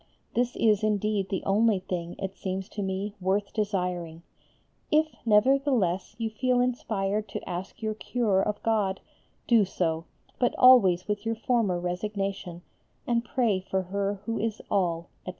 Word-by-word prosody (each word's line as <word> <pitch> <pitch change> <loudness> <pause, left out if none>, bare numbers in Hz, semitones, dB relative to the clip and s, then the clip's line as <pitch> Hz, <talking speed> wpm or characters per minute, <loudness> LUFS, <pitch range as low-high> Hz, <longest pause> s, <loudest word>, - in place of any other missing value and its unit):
This 245 0 0
is 215 -2 +3
indeed 210 -2 0
the 190 - -2
only 210 +1 +3
thing, 175 -2 -4
it 195 -1 -5
seems 190 0 -4
to 210 - -5
me, 195 +1 -3
worth 195 +2 0
desiring. 180 -6 -2 0.7
If, 310 +1 +2
nevertheless, 220 -5 +2
you 225 -1 -2
feel 250 +3 +1
inspired 215 -4 -1
to - - -6
ask 180 +5 -6
your 215 0 0
cure 215 -3 0
of 210 +1 -2
God, 205 -4 +1 0.5
do 230 -3 +5
so, 165 -4 -1 0.3
but 245 - +2
always 200 -9 +6
with 210 -1 -2
your 225 0 -1
former 225 -6 +1
resignation, 180 -1 -3 0.4
and 235 -1 +1
pray 225 -4 +1
for 190 0 -2
her 200 +2 -2
who 230 0 -2
is 220 -1 -2
all, 170 -3 0
etc. - - -6
205 Hz, 150 wpm, -27 LUFS, 185-225 Hz, 0.7 s, always